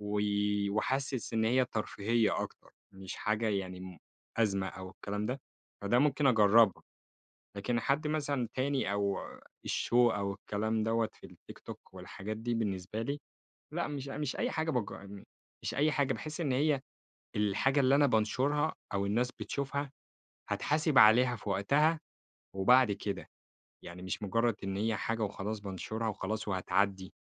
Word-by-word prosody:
و 105 0 -2 0.5
وحاسس 130 +4 -1
إن 110 -1 +2
هي 125 +3 +4
ترفيهية 110 0 0
أكتر، - - -9 0.2
مش 95 -1 -7
حاجة 110 +1 0
يعني 95 -3 -2
م 95 -2 -9 0.4
أزمة 100 -4 +1
أو 95 0 -7
الكلام 105 +2 -4
ده، 130 +2 -3 0.4
فده 100 +4 +2
ممكن 145 +1 +3
أجرّبها، 110 -3 +5 0.7
لكن 115 +4 0
حد 140 +3 +1
مثلًا 145 -5 -1
تاني 130 -4 0
أو 100 -1 0 0.5
الshow - - -2
أو 110 -5 +4
الكلام 110 +2 -2
دَوَّة 115 0 +1
في - - -13
الtiktok - - -11 0.2
والحاجات 105 +3 -6
دي 120 +1 -2
بالنسبة 100 -1 -2
لي 140 +5 -3 0.5
لأ، 170 +1 -1
مش 140 -2 -5
أ - - -5
مش 150 -3 -2
أي 245 - -1
حاجة 160 0 -1
باج 105 -6 -3 0.5
مش - - -2
أي 150 +2 +3
حاجة 140 -3 +1
باحس 155 +5 -5
إن 145 -5 0
هي 140 +1 +2 0.6
الحاجة 105 +7 +2
اللي 135 0 +5
أنا 145 0 +5
بانشرها، 135 +7 +1 0.2
أو 100 0 +1
الناس 120 +5 +1
بتشوفها 140 0 -2 0.6
هاتحاسب 150 -1 +2
عليها 120 +3 +7
في 105 - -8
وقتها 150 +11 +3 0.6
وبعد 125 +4 +5
كده. 100 0 -4 0.5
يعني 85 +1 -9
مش 95 +3 -4
مجرد 115 +3 +1
إن 95 0 -2
هي 110 +2 0
حاجة 115 +2 -2
وخلاص 105 +1 -3
بانشرها 105 +3 -4
وخلاص 105 +1 -3
وهتعدي. 95 0 0
115 Hz, 150 wpm, -32 LUFS, 100-135 Hz, 0.7 s, عليها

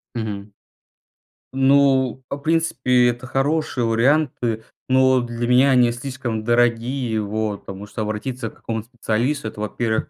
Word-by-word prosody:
Мгм. 105 -3 -5 1.0
Ну, 135 -2 +3
в 140 - -3
принципе, 140 -5 +2
это 120 +2 -5
хорошие 135 0 0
варианты, 120 -1 +1 0.3
но 130 0 +4
для 120 0 -3
меня 130 +3 +5
они 125 -2 +4
слишком 120 -3 -4
дорогие, 120 0 +1
вот, 105 0 -3
потому 100 +1 -8
что 110 - -6
обратиться 110 +3 -3
к - - -20
какому-то 110 -1 -5
специалисту- 120 +2 -1
это, 105 -1 -7
во-первых, 110 +1 -2
120 Hz, 130 wpm, -21 LUFS, 110-130 Hz, 1.0 s, меня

